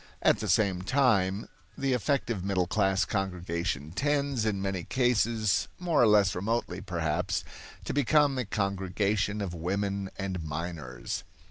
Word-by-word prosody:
At - - +4
the 110 - -3
same 95 -1 +2
time 105 -4 +2 0.3
the 135 -1 +1
effective 125 -5 0
middle 95 -2 +1
class 95 0 +2
congregation 85 -6 -2
tends, 140 - 0
in 100 -2 0
many 95 -2 -2
cases, 115 -4 +1
more 175 -4 +2
or 120 - +6
less 100 -3 +5
remotely 100 -1 -2
perhaps, 85 -5 -1 0.4
to - - -2
become 145 0 +3
a 125 - -1
congregation 100 +1 -1
of 95 -3 -3
women 100 +3 -2
and 95 -3 -3
minors. 75 -6 -5
100 Hz, 135 wpm, -29 LUFS, 90-115 Hz, 0.4 s, or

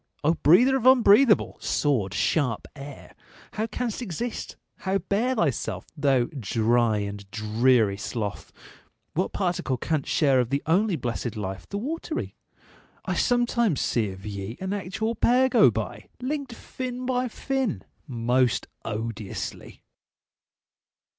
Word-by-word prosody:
O 155 +3 +4
breather 210 - +5
of 255 -1 +1
unbreathable, 240 -2 +5
sword 125 -10 0
sharp 125 -6 0
air, 140 0 -10 0.4
How 220 +1 -1
canst 240 0 -3
exist? 235 +3 -4 0.2
How 190 +1 0
bear 205 +7 0
thyself, 115 - -1
thou 140 -4 +3 0.2
dry 115 +1 +2
And 100 -1 -5
dreary 110 0 +2
sloth? 105 0 -4 0.6
What 185 +4 -1
particle 175 -8 -1
canst 155 +2 -2
share 140 -4 +3
Of 125 -2 0
the 140 +2 -1
only 185 +4 +2
blessed 120 -3 -3
life, 95 -3 -5
the 200 - -3
watery? 315 +7 -4 0.7
I - - -1
sometimes 235 - +2
see 110 -4 0
of 95 +1 -10
ye 100 +2 -5
an 190 +1 -3
actual 205 +3 -2
pair 250 +3 +3
Go - - +6
by! - - -5
linked 270 0 -3
fin 250 +1 -6
by 250 0 0
fin! 265 -1 -2 0.2
most 125 0 +1 0.2
odiously. 110 -2 -5
150 Hz, 125 wpm, -26 LUFS, -, 0.7 s, Go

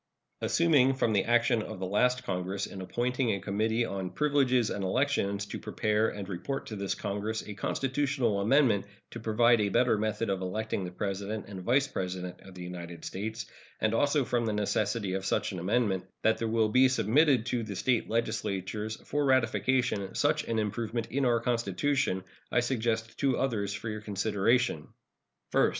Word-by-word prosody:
Assuming 145 -6 +4
from 115 -4 +1
the 100 - +2
action 120 -1 +3
of 110 -1 -6
the 95 - -3
last 125 +6 +2
Congress 95 -2 -2
in 95 - -8
appointing 125 +5 -1
a 100 - -1
Committee 110 +4 0
on 95 -3 -4
Privileges 135 -5 +2
and 100 - -3
Elections 100 -2 0
to - - -6
prepare 110 +1 0
and 100 -2 -6
report 105 +9 -4
to 110 - -6
this 100 -1 -2
Congress 105 +2 -3
a 105 - -5
constitutional 130 0 0
amendment 115 -3 +3 0.3
to 120 - -7
provide 115 +1 +3
a 100 - +1
better 115 +1 +3
method 110 0 -1
of 95 -1 -2
electing 100 +1 -2
the - - -4
President 100 +3 -3
and 95 -2 -7
Vice 135 +8 +2
President 90 -6 -4
of 95 -1 -13
the 90 - -7
United 85 -2 -7
States, 110 +3 -4 0.3
and 110 0 +1
also 145 +3 +2
from 120 -1 0
the 110 - 0
necessity 105 -1 0
of 95 0 -2
such 105 +2 0
an 95 - -5
amendment, 100 0 +1 0.2
that 110 - +3
there 115 - -1
will 110 -1 +2
be 130 +4 +6
submitted 125 +2 +3
to 125 -1 -1
the 105 -3 -5
State 120 +5 +1
legislatures 110 -2 -2
for 145 0 0
ratification 125 -4 +1
such - - +2
an 115 - -1
improvement 110 +2 -2
in 135 +1 +1
our 120 -1 +3
Constitution, 115 -1 0 0.3
I 120 - +3
suggest 115 -2 -1
two 135 -3 +2
others 110 -7 -1
for 105 - -5
your 110 -1 -4
consideration: 105 -2 +1 0.6
First. - - +4
110 Hz, 175 wpm, -29 LUFS, 100-125 Hz, 0.6 s, be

